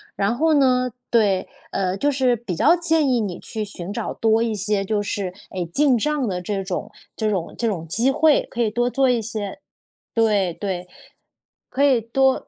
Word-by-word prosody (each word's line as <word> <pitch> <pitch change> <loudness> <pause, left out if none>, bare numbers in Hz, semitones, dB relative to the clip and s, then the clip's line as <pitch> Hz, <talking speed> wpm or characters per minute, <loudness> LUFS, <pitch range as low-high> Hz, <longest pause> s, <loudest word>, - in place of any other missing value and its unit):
然 200 +4 0
后 315 +4 +2
呢 255 -3 +3 0.2
对， 205 -5 +2 0.2
呃， 190 -1 -1
就 290 +8 +1
是 260 -3 +2
比 215 -6 -5
较 335 - +5
建 325 -4 +2
议 245 - +2
你 195 -5 -3
去 215 -2 -5
寻 190 -2 -7
找 - - -3
多 225 0 +2
一 225 -2 -1
些 200 0 0
就 210 0 0
是， 200 -2 -3 0.2
诶， 180 -2 -3
进 265 - +2
账 290 +1 0
的 180 -2 -2
这 195 +1 -3
种 190 +3 -4 0.3
这 215 -1 0
种 180 -4 -3
这 235 - 0
种 165 -6 -3
机 235 +11 +2
会， 305 +1 +3
可 240 - -2
以 225 - +2
多 240 +3 0
做 270 -1 +2
一 245 - +2
些 215 +1 -5 0.5
对， 205 -6 +2
对。 180 -2 -4 0.8
可 275 - +1
以 270 -4 +5
多 265 +4 +1
220 Hz, 205 characters per minute, -22 LUFS, 195-260 Hz, 0.8 s, 较